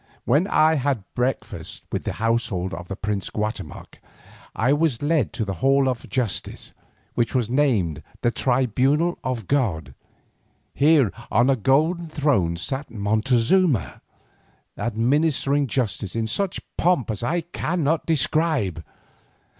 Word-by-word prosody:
When 150 +10 +3
I 160 -4 +4
had 135 -6 0
breakfasted 125 +1 -3
with - - -3
the - - -2
household 110 -5 -1
of 85 +1 -7
the 95 - -5
prince 100 -1 -3
Guatemoc, 105 0 -5 0.6
I 125 +5 +2
was 145 -5 0
led 145 - +1
to 110 - -2
the 100 - -3
hall 135 0 +4
of 125 -3 -3
justice, 120 -8 -3 0.4
which 120 +2 -1
was 120 -3 0
named 110 - +1 0.2
the 120 - +2
"tribunal 135 +7 +1
of 125 -5 -3
god." 90 - -1 0.8
Here 145 -7 +4 0.2
on 120 +5 +3
a - - +3
golden 155 - +1
throne 135 - +1
sat 135 - -3
Montezuma, 115 - +1 0.7
administering 140 +4 +1
justice 110 -5 -2
in 115 -1 0
such 190 - -1 0.2
pomp 165 -10 +2
as 105 - -4
I 170 +9 0
cannot 165 -2 -1
describe. 145 - +1
130 Hz, 130 wpm, -23 LUFS, 110-150 Hz, 0.8 s, I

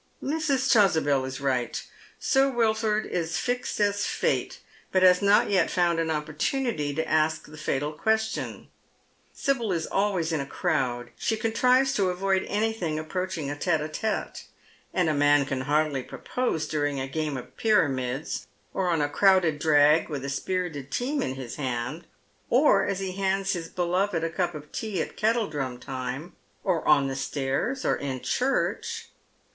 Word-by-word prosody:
Mrs. 275 -3 +1
Chasubel 160 - +4
is 130 0 -5
right. 130 -4 -1 0.4
Sir 270 0 +3
Wilford 220 -3 +1
is 170 -1 -2
fixed 245 +6 -2
as 205 0 +2
fate, - - -1 0.3
but 185 0 +3
baa 180 +1 +6
not 200 +1 +4
yet 195 - +3
found 175 -2 +2
an 165 -1 0
opportunity 155 - -1
to 160 +1 -1
ask 155 0 +1
the 150 - -12
fatal 150 -1 -2
question. 220 +6 -1 0.6
Sibyl 240 -7 -1
is 165 -3 -1
always 190 -5 0
in 160 -3 0
a 135 - -5
crowd. 130 -9 -1
She 220 - 0
contrives 250 +4 +3
to 195 -2 +2
avoid 190 +1 0
anything 205 -7 -1
approaching 160 -2 -3
a - - -3
tete 160 +2 +1
d 150 - -3
tete. 220 +7 -3 0.5
And 180 -2 +1
a 155 - +2
man 145 -1 +4
can 135 -1 -2
hardly 145 0 +1
propose 165 - -3
during 145 -2 -1
a 130 - -3
game 150 0 -2
of 125 - -10
pjTamids, 135 - 0 0.3
or 185 -2 0
on 165 -3 +2
a - - +1
crowded 175 -1 +3
drag 150 +1 +4
with 140 -3 -4
a - - -3
spirited 150 -2 -3
team 275 - -1
in 130 - -2
his 130 -3 -7
hand, 130 +4 -3 0.4
or 275 +5 +4
as 195 0 -2
he 190 -1 -2
hands 195 +1 0
his 170 -3 -4
beloved 180 0 0
a 165 - -1
cup 175 -1 -1
of 150 0 -9
tea 215 -5 -3
at - - -3
kettledrum 155 - 0
time, 130 +5 -5 0.3
or 180 -5 0
on 140 -2 +5
the 135 - -3
stairs, 135 - -2
or - - +3
in 130 -3 -4
church. 455 - -1
165 Hz, 165 wpm, -26 LUFS, 145-205 Hz, 0.6 s, baa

